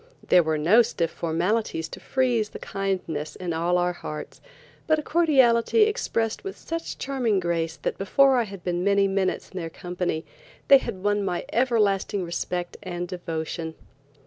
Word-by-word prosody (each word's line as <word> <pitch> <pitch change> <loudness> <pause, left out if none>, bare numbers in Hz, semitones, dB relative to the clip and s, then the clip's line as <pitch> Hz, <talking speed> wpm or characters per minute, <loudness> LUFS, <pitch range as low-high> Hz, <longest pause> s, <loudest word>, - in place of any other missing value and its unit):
There 180 - +7
were 160 -1 0
no 180 +10 +5
stiff 180 -8 -1
formalities 170 +1 -1
to - - -9
freeze 245 -5 0
the - - -8
kindness 180 -6 -3
in 180 -2 -4
all 170 +2 +1
our 180 0 +1
hearts, 155 -3 -8 0.5
but 310 0 +4
a 305 - -3
cordiality 290 - +4
expressed 230 - -1
with 390 - -6
such 330 0 -5
charming 250 -7 0
grace 165 -2 -1
that - - -3
before 265 +7 +4
I 240 - +2
had 195 -3 -10
been 175 0 -1
many 200 0 +3
minutes 195 -1 -1
in 190 - -5
their 165 -1 -4
company, 175 -1 -3 0.4
they 275 - +9
had 185 -7 -6
won 205 0 +1
my 180 -3 -2
everlasting 210 -5 +1
respect 175 0 -3
and 175 -2 -4
devotion. 165 -2 -4
190 Hz, 165 wpm, -25 LUFS, 175-230 Hz, 0.5 s, they